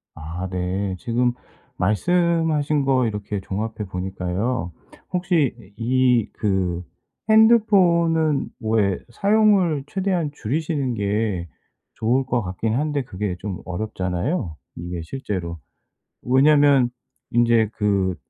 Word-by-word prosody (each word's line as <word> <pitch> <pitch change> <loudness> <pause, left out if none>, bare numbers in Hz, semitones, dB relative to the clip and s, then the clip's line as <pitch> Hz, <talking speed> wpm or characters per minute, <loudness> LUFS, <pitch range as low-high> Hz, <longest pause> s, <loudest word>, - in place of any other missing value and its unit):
아 80 +4 -5
네. 95 +1 -2
지금 120 +3 0 0.4
말씀하신 155 - +1
거 130 -2 +3
이렇게 105 -1 -4
종합해 105 +3 -4
보니까요. 95 +3 -2 0.4
혹시 175 -6 +1 0.2
이 125 -1 +2
그 95 -4 -1 0.5
핸드폰은 175 -9 +4
왜 110 -5 +1
사용을 195 - +3
최대한 180 -2 -1
줄이시는 145 0 -2
게 100 -3 -1 0.5
좋을 120 +5 +1
것 125 -2 0
같긴 95 +3 -2
한데 145 +2 0
그게 100 -4 -4
좀 95 -3 -5
어렵잖아요, 90 - -2 0.2
이게 85 0 -5
실제로. 85 -6 -5 0.6
왜냐하면 140 0 +5 0.4
인제 115 -2 +3
그 100 -3 +1
115 Hz, 215 characters per minute, -22 LUFS, 95-150 Hz, 0.6 s, 왜냐하면